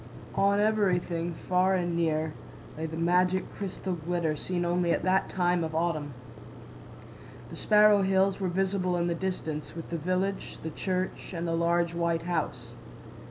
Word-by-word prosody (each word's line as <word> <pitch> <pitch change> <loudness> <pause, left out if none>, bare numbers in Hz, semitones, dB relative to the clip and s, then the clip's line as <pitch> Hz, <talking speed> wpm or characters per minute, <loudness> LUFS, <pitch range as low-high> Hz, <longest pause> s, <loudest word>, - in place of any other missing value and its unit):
On 200 +1 +3
everything—far 185 -3 +1
and 175 -2 -1
near—lay 160 -1 -3
the 160 0 -6
magic 180 +2 +2
crystal 190 -1 -4
glitter 170 -1 -1
seen 175 +3 -2
only 175 0 +1
at - - 0
that 185 +1 +2
time 175 -1 +1
of 160 -1 -4
autumn. 155 -4 -1 1.4
The - - -7
Sparrow 210 -1 +5
Hills 190 0 +2
were 190 - -1
visible 185 0 0
in 170 - +1
the 175 - 0
distance, 165 -5 -4
with 165 0 -8
the 170 - -2
village, 185 +4 -2
the 160 - -4
church, 185 +3 -3
and 170 0 -3
the 165 - 0
large 170 0 +1
white 170 -1 0
house. 145 -9 -3
175 Hz, 150 wpm, -28 LUFS, 165-185 Hz, 1.4 s, Sparrow